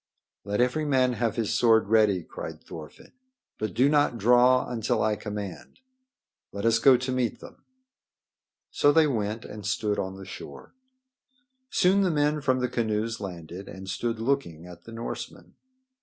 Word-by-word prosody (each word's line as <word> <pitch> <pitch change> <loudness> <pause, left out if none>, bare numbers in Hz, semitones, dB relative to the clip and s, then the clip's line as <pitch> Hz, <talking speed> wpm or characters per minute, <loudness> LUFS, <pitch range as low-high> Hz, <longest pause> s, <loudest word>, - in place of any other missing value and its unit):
"Let 105 +3 -1
every 125 +5 +1
man 130 -4 +2
have 115 -2 -1
his 115 -3 -1
sword 115 -3 +4
ready," 105 -5 +3
cried - - -8
Thorfinn. 80 -2 -11 0.5
"But 110 - -3
do 130 - +4
not 145 -4 +2
draw 125 +3 +4
until 120 -1 -1
I 110 0 +1
command. 105 -3 -7 0.7
Let 100 +2 -5
us 115 0 +4
go 130 +1 +6
to 130 +1 -3
meet 125 -3 -1
them." - - -14 1.1
So 145 - +4
they 160 +1 +5
went 110 -5 -2
and 105 -1 -9
stood 105 0 -1
on 95 0 -4
the 95 - -10
shore. 70 -6 -10 1.0
Soon 190 +2 +3
the 190 - +2
men 150 -1 +1
from 130 -2 +1
the 125 - +1
canoes 115 -1 -2
landed 90 -1 -8
and 95 0 -9
stood 115 +5 -2
looking 115 - -2
at 90 -1 -13
the 115 - -10
Norsemen. 115 +1 -7
115 Hz, 160 wpm, -26 LUFS, 100-130 Hz, 1.1 s, go